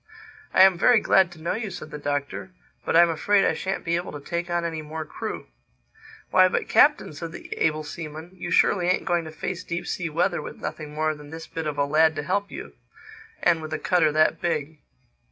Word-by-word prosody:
"I 185 - +7
am 190 -2 +5
very 245 +2 +6
glad 190 -3 +3
to 160 - -15
know 170 - 0
you," 220 -1 -3
said 175 -4 -8
the 150 - -6
Doctor. 145 -1 -3 0.4
"But - - 0
I'm 170 0 +6
afraid 195 +5 +2
I - - +2
shan't 190 0 -4
be 170 0 +1
able 175 - -5
to 145 - -6
take 170 +4 -4
on 175 0 0
any 160 -2 -3
more 155 +1 -6
crew." - - -6 0.9
"Why, 185 0 +6
but 185 - -1
Captain," 295 - +4
said 165 +2 -7
the - - -7
able 155 -1 +1
seaman, 160 +2 -8
"you 175 -1 -6
surely 175 +1 +3
ain't 185 - +1
going 175 -2 0
to 155 - -7
face 180 +3 -5
deep 175 0 -4
sea 175 -2 -3
weather 175 +3 0
with - - -8
nothing 150 -1 -6
more 155 0 +1
than 150 -1 -12
this 160 +1 -8
bit 160 -1 -5
of 150 - -3
a 140 - +2
lad 155 +2 +3
to 150 - -3
help 200 +5 -1
you—and 440 - -4
with 155 0 -6
a - - 0
cutter 165 -4 +2
that 155 +1 +2
big!" 155 -2 -2
170 Hz, 220 wpm, -25 LUFS, 155-180 Hz, 0.9 s, I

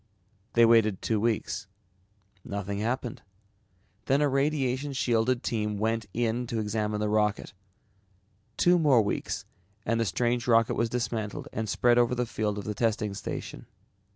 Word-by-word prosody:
They 115 0 +6
waited 110 -4 +4
two 110 -2 +1
weeks. 110 -2 -1 0.8
Nothing 100 0 -4
happened. 120 +2 -2 0.9
Then 135 +1 +3
a 150 - +3
radiation 140 -1 0
shielded 120 -1 +1
team 105 -2 -1
went 110 +1 -1
in 120 +3 -1
to 115 - -3
examine 105 0 -1
the 105 - 0
rocket. 105 0 0 1.0
Two 175 0 +4
more 135 -8 +5
weeks 100 - -3 0.4
and 115 +1 +1
the 115 - +2
strange 120 +5 0
rocket 115 -1 +4
was 115 0 0
dismantled 110 -3 -3
and 110 -1 -3
spread 120 0 +3
over 120 +1 +2
the 125 0 0
field 105 -2 -2
of 100 - -4
the 105 - -3
testing 105 -1 0
station. - - -6
115 Hz, 150 wpm, -28 LUFS, 105-125 Hz, 1.0 s, They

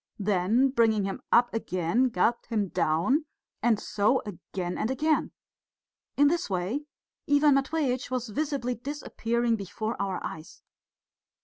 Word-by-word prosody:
Then 210 +6 +2
bringing 225 -5 +3
him 195 - -4
up 240 +1 +4
again, 225 +3 +1
gulped 235 +3 0
him 210 -5 -1
down, 170 - +1 0.4
and 225 -2 +3
so 210 +5 +1
again 180 -2 -5
and 220 - -1
again. 305 +4 +1 0.9
In 290 +1 +6
this 335 -3 0
way 195 +11 -2 0.5
Ivan 290 0 +5
Matveitch 275 -2 0
was 250 -2 -2
visibly 275 0 -1
disappearing 235 -3 -1
before 215 +3 -4
our 195 -2 -2
eyes. 160 0 -8
235 Hz, 125 wpm, -28 LUFS, 200-270 Hz, 0.9 s, In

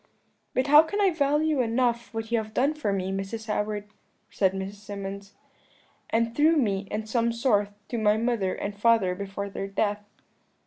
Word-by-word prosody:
"'But 255 - +2
how 295 +2 +8
can 365 +6 -3
I 395 -2 +4
value 300 -1 +1
enough 235 0 0
what 225 0 -5
you 235 - +3
have 215 0 -7
done 275 +4 +2
for 300 -9 -2
me, 190 -1 -1
Mrs. 195 +3 -4
Howard?' 210 -1 -2 0.4
said 190 -2 +2
Mrs. 195 +1 -5
Symonds, 200 -1 -7 0.8
'and 230 +1 0
through 315 +3 +4
me, 200 -7 0
in 215 +1 -3
some 230 +1 +1
sort, 230 -4 +1 0.2
to 235 - -2
my 210 0 +3
mother 225 -5 0
and 200 0 -4
father 205 -3 +3
before 200 +1 -5
their 195 0 -5
death.' 205 +1 -1
220 Hz, 175 wpm, -26 LUFS, 200-240 Hz, 0.8 s, how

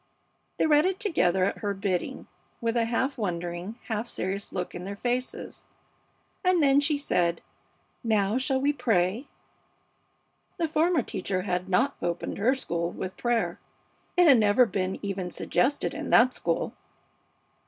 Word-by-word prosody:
They - - +2
read 305 +2 +5
it 380 +1 -2
together 190 - +2
at 200 - -2
her 205 -1 -2
bidding, 195 -3 -2 0.3
with 230 -1 -1
a 235 +3 +1
wondering, 175 0 -3
half 220 +1 -3
serious 195 0 -3
look 180 - -4
in 175 - -6
their 200 +2 -5
faces, 245 +4 -3 0.8
and 365 -1 +3
then 275 0 +5
she 290 +1 +1
said, 175 -11 +1 0.6
"Now, 215 0 +2
shall 265 0 0
we 285 +2 +2
pray?" 220 0 +1 1.3
The 335 -3 0
former 320 -1 +2
teacher 185 -2 -3
had 180 -1 -2
not 260 +10 +2
opened 175 +2 -3
her 250 +6 +3
school 170 -9 -2
with 185 +1 -6
prayer. 240 -2 0 0.6
It 355 - +6
had 265 -6 +7
never 215 +4 +5
been 190 -4 -2
even 190 -2 -3
suggested 275 +9 0
in 310 -1 -5
that 255 +2 +6
school. - - -1
225 Hz, 145 wpm, -27 LUFS, 185-275 Hz, 1.3 s, had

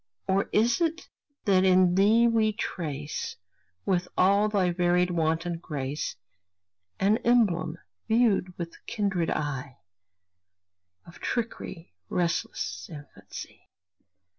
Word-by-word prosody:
Or 195 +1 +1
is 235 +7 +2
it 330 0 -1 0.4
that 190 -2 +4
in 185 -1 +5
thee 210 +5 +5
we 220 -2 +2
trace, 150 -8 -4 0.5
With 180 -2 +1
all 200 +3 +4
thy 190 -4 +2
varied 180 0 +2
wanton 165 0 0
grace, 145 -5 -4 0.8
An 205 +3 +3
emblem, 215 -9 +2 0.3
viewed 220 -6 +2
with 170 -1 -7
kindred 195 -6 0
eye 135 -3 -3 1.3
Of 170 - -14
tricky, 225 - -4 0.2
restless 95 - -2
infancy? 145 -2 -10
180 Hz, 100 wpm, -27 LUFS, 165-210 Hz, 1.3 s, in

